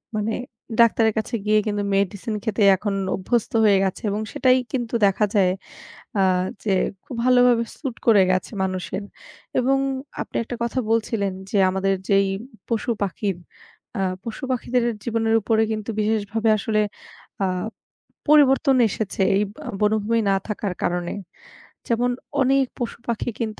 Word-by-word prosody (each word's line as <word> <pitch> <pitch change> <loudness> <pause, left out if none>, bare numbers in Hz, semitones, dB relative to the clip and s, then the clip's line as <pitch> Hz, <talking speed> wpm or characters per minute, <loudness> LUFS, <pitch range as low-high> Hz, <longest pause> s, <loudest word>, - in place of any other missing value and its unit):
মানে 215 +1 -1 0.5
ডাক্তারের 225 -1 +4
কাছে 225 +2 -3
গিয়ে 215 0 +4
কিন্তু 205 -1 -1
মেডিসিন 200 +3 -1
খেতে 220 -1 -1 0.2
এখন 205 +1 -2 0.2
অভ্যস্ত 230 +4 -1
হয়ে 205 -2 +5
গেছে 190 +3 -2
এবং 210 +2 -2
সেটাই 255 -1 +4
কিন্তু 240 -3 -3
দেখা 200 +2 +3
যায় 185 -2 +4 0.7
আ - - +4 0.4
যে 205 - 0 0.3
খুব - - -8
ভালোভাবে 245 -2 +5
স্যুট 265 -7 -5
করে 215 -4 +6
গেছে 185 - -1
মানুষের 190 +1 -3 0.5
এবং 270 +2 +3 0.4
আপনি - - -8
১ - - -10
টা 245 - -3
কথা 235 +2 -2
বলছিলেন 220 -3 0 0.2
যে, - - -1
আমাদের 195 +1 +1
যেই 195 -1 +4 0.4
পশু-পাখির 210 -4 -1 0.6
আ - - 0 0.2
পশু-পাখিদের 250 +1 -1 0.2
জীবনের 225 -1 +1
উপরে 220 +1 +2
কিন্তু 215 0 -4
বিশেষভাবে 215 +1 0
আসলে 215 +1 0 0.6
আ - - +2 0.8
পরিবর্তন 280 -1 +5
এসেছে 205 -1 -3
এই 205 - +3
ব - - -19 0.3
বনভূমি 215 +2 +2
না 195 - +3
থাকার 210 -3 -3
কারণে। 175 0 -1 0.7
যেমন, 245 +1 +1 0.3
অনেক 270 +1 +3
পশুপাখি 235 0 -3
কিন্তু 220 -2 -3
220 Hz, 135 wpm, -23 LUFS, 200-235 Hz, 0.8 s, করে